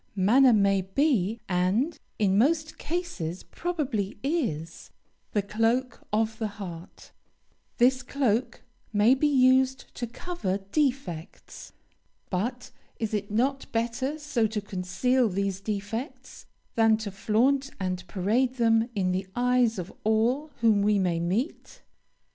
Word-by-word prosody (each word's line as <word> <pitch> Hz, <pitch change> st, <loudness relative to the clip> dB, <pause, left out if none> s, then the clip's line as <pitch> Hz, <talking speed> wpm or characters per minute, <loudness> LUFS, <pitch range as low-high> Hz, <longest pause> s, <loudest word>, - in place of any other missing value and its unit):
Manner 240 Hz, +7 st, +5 dB
may 200 Hz, -3 st, +3 dB
be, 220 Hz, -, +1 dB
and, 195 Hz, -, +1 dB, 0.2 s
in 195 Hz, -3 st, +2 dB
most 310 Hz, +8 st, +1 dB
cases, 290 Hz, -, -4 dB
probably 280 Hz, -, -3 dB
is, 200 Hz, -, -2 dB, 0.4 s
the 205 Hz, -, +1 dB
cloak 225 Hz, +5 st, 0 dB
of 220 Hz, +1 st, 0 dB
the 220 Hz, -, 0 dB
heart; 190 Hz, -5 st, -9 dB, 0.7 s
this 255 Hz, +2 st, +4 dB
cloak 250 Hz, -3 st, -1 dB, 0.3 s
may 215 Hz, +3 st, +5 dB
be 270 Hz, +3 st, +2 dB
used 260 Hz, -1 st, +3 dB
to 240 Hz, -, -4 dB
cover 230 Hz, -, -3 dB
defects, 250 Hz, -, -3 dB, 0.6 s
but 240 Hz, +7 st, -3 dB, 0.3 s
is 220 Hz, -1 st, -3 dB
it 205 Hz, -1 st, -2 dB
not 265 Hz, +6 st, 0 dB
better 240 Hz, +5 st, -1 dB
so 295 Hz, -7 st, 0 dB
to 215 Hz, 0 st, -3 dB
conceal 210 Hz, +6 st, 0 dB
these 195 Hz, 0 st, -2 dB
defects, 215 Hz, -, -5 dB, 0.3 s
than 225 Hz, -1 st, +4 dB
to 215 Hz, -2 st, -5 dB
flaunt 255 Hz, +8 st, +1 dB
and 185 Hz, -1 st, -3 dB
parade 220 Hz, +8 st, 0 dB
them 225 Hz, -1 st, +3 dB
in 185 Hz, -2 st, +1 dB
the 185 Hz, +1 st, -2 dB
eyes 245 Hz, -2 st, +2 dB
of 180 Hz, 0 st, -6 dB
all 235 Hz, +8 st, +1 dB
whom 220 Hz, -3 st, +4 dB
we 210 Hz, 0 st, +3 dB
may 180 Hz, -3 st, +1 dB
meet? 195 Hz, -, -3 dB
225 Hz, 125 wpm, -27 LUFS, 195-260 Hz, 0.7 s, Manner